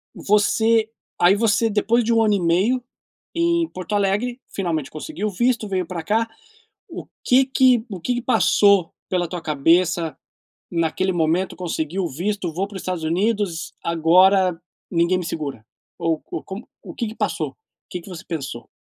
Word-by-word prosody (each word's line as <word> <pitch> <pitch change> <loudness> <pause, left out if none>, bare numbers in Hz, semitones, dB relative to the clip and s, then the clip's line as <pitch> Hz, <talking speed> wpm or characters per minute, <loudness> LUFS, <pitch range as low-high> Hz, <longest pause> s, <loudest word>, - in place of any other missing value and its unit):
você 220 +2 +2 0.3
aí 180 +3 +6
você 225 +1 +2
depois 220 +3 +2
de 235 - 0
1 225 -1 +4
ano 210 - +3
e 200 - +2
meio 190 +9 +2 0.5
em 340 0 +2
Porto 185 +2 -6
Alegre, 205 +5 0
finalmente 165 -7 -2
conseguiu 215 - -4
o - - -3
visto, 235 +3 +1
veio 185 -2 -1
pra 175 -2 -5
cá, 220 +6 +1 0.6
o - - -7 0.2
que 260 +2 +4
que 255 -3 +3
o 190 - -5
que 245 +8 0
que 240 - -2
passou 200 -8 +4 0.2
pela 180 -2 0
tua 175 - -4
cabeça 165 +2 +2 0.5
naquele 175 +3 0
momento, 175 +2 0
conseguiu 175 +1 -2
o - - 0
visto 180 +3 -3
vou 190 +4 -1
para 200 - -13
o - - -3
Estados 180 -3 -4
Unidos, 180 0 -1
agora 180 +2 +4 0.3
ninguém 170 +1 +2
me 180 - -4
segura? 140 -9 -5 0.3
Ou 165 -1 0
co - - -7
como 195 +5 -8
o - - -9
que 235 - -3
que 215 - -8
passou? - - -1
O - - -32 0.3
que 180 - -4
que 180 - -13
você 180 -3 -8
pensou? 140 -7 -5
190 Hz, 175 wpm, -22 LUFS, 170-220 Hz, 0.6 s, aí